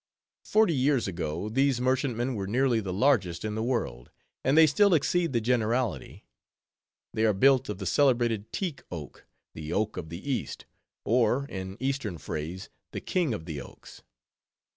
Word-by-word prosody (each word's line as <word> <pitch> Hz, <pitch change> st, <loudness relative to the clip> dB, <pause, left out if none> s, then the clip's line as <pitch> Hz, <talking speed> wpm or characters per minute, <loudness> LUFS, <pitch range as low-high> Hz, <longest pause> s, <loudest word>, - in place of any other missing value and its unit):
Forty 215 Hz, -5 st, +3 dB
years 135 Hz, -3 st, +2 dB
ago, 85 Hz, 0 st, -3 dB
these 135 Hz, +3 st, +2 dB
merchantmen 130 Hz, -1 st, 0 dB
were 100 Hz, -4 st, -3 dB
nearly 125 Hz, +2 st, +2 dB
the 100 Hz, -4 st, -4 dB
largest 100 Hz, -5 st, +1 dB
in 105 Hz, -, -2 dB
the 110 Hz, -, -2 dB
world; 110 Hz, -, -2 dB, 0.3 s
and 135 Hz, +4 st, +2 dB
they 160 Hz, -, +9 dB
still 190 Hz, +5 st, +4 dB
exceed 170 Hz, +2 st, +1 dB
the 120 Hz, -, +1 dB
generality. 120 Hz, +1 st, -1 dB, 0.9 s
They 110 Hz, -, 0 dB
are 110 Hz, -1 st, +4 dB
built 130 Hz, +5 st, +4 dB
of 105 Hz, -, -3 dB
the 95 Hz, -, -6 dB
celebrated 120 Hz, -2 st, +2 dB
teak 175 Hz, -7 st, -3 dB
wood, 80 Hz, -6 st, -8 dB, 0.3 s
the 80 Hz, 0 st, -7 dB
oak 110 Hz, +1 st, -1 dB
of 80 Hz, -3 st, -5 dB
the 85 Hz, -, -8 dB
East, 130 Hz, -, -3 dB, 0.4 s
or 125 Hz, +4 st, +2 dB
in 95 Hz, 0 st, -6 dB
Eastern 130 Hz, -8 st, -2 dB
phrase, 80 Hz, +4 st, -5 dB
_"the -, -, -10 dB
King 175 Hz, -7 st, 0 dB
of 80 Hz, -, -8 dB
the 75 Hz, -4 st, -5 dB
Oaks." -, -, -13 dB
115 Hz, 165 wpm, -28 LUFS, 95-135 Hz, 0.9 s, they